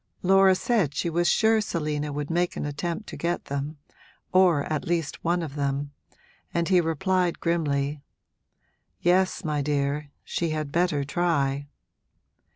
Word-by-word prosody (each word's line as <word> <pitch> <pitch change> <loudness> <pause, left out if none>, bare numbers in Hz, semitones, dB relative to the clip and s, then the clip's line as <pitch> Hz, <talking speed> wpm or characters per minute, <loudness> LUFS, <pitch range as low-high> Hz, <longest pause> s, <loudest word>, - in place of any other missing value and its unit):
Laura 190 0 +6
said 185 - +1
she 170 +3 -1
was 175 +1 +1
sure 220 -1 +4
Selina 150 -6 -2
would 145 +1 -4
make 175 +1 0
an - - -2
attempt 170 +7 -3
to - - -7
get 170 +1 -2
them 140 +2 -4 0.6
or 180 -6 +5
at 155 0 -3
least 165 -3 -2
one 175 +1 +1
of 150 -4 -6
them; 140 0 -2 0.6
and 170 0 0
he 180 -2 +5
replied, 175 +2 0
grimly, 145 -4 0 1.0
'Yes, 185 +2 +2
my 150 -2 0
dear, 145 0 -1
she 170 - -2
had 155 -2 -3
better 165 -3 +1
try!' 145 -3 0
160 Hz, 145 wpm, -26 LUFS, 145-175 Hz, 1.0 s, Laura